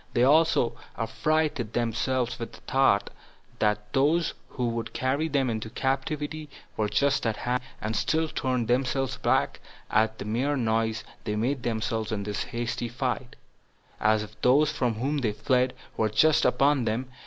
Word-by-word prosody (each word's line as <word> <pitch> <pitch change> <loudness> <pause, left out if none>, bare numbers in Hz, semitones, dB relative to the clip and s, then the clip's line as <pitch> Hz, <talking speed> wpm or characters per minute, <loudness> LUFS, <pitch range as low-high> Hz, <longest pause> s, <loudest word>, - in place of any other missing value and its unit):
They 120 - +4
also 140 -4 +4 0.2
affrighted 145 -1 0
themselves 120 +2 0
with 115 - -6
this - - -13
thought, 130 -7 +2 0.5
that 105 0 0
those 155 +5 +2 0.2
who 125 -3 -2
would 115 -1 -4
carry 135 +5 0
them 140 -4 +1
into 110 -2 -3
captivity 145 +4 -2 0.3
were 105 -1 0
just 130 +3 +2
at 110 -2 -1
hand, 125 +1 -1 0.2
and 110 +1 -3
still 160 0 +1
turned 130 -6 -1
themselves 130 +1 0
back - - +1 0.3
at 110 +1 +2
the - - -6
mere 130 +7 0
noise 110 -2 0 0.2
they 105 - -2
made 125 +5 0
themselves 115 -1 -2
in 105 -2 -2
this 105 0 -3
their - - -13
hasty 120 0 -2
flight, 125 0 -3 0.6
as 110 0 +3
if 105 +1 -13
those 145 +4 +4
from 120 -6 0
whom 140 +6 -1
they 110 -6 0
fled 125 +3 +1 0.2
were 110 - +2
just 150 +9 +4
upon 140 -3 +3
them. 115 +4 -1
120 Hz, 165 wpm, -27 LUFS, 110-135 Hz, 0.6 s, They